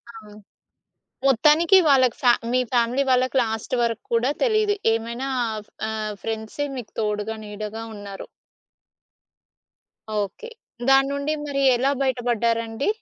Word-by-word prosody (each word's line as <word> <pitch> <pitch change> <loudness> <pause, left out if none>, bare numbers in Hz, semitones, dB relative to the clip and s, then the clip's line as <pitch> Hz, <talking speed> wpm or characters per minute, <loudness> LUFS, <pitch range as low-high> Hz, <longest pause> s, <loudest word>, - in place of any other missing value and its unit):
అవును. 210 -1 -13 0.9
మొత్తానికి 305 - +5
వాళ్ళకి 260 -4 +4
ఫ 250 - +1 0.2
మీ 255 0 +3
ఫ్యామిలీ 245 +3 +2
వాళ్ళకి 255 +1 +2
లాస్ట్ 220 +2 -4
వరకు 230 -1 -2
కూడా 235 +3 +2
తెలీదు. 430 -3 +2 0.2
ఏమైనా 235 +4 -3 0.2
ఆహ్, 215 -1 -5 0.3
ఆహ్, 215 -1 -3
ఫ్రెండ్సే 225 +6 -3
మీకు 240 - -8
తోడుగా, 210 +1 -2
నీడగా 210 +2 -6
ఉన్నారు. 200 -1 -8 1.9
ఓకే. 205 - -5 0.4
దాన్నుండి 280 +2 +3
మరి 275 -1 -2
ఎలా 265 +3 +1
బయటపడ్డారండి? 235 - -1
235 Hz, 110 wpm, -23 LUFS, 220-275 Hz, 1.9 s, మొత్తానికి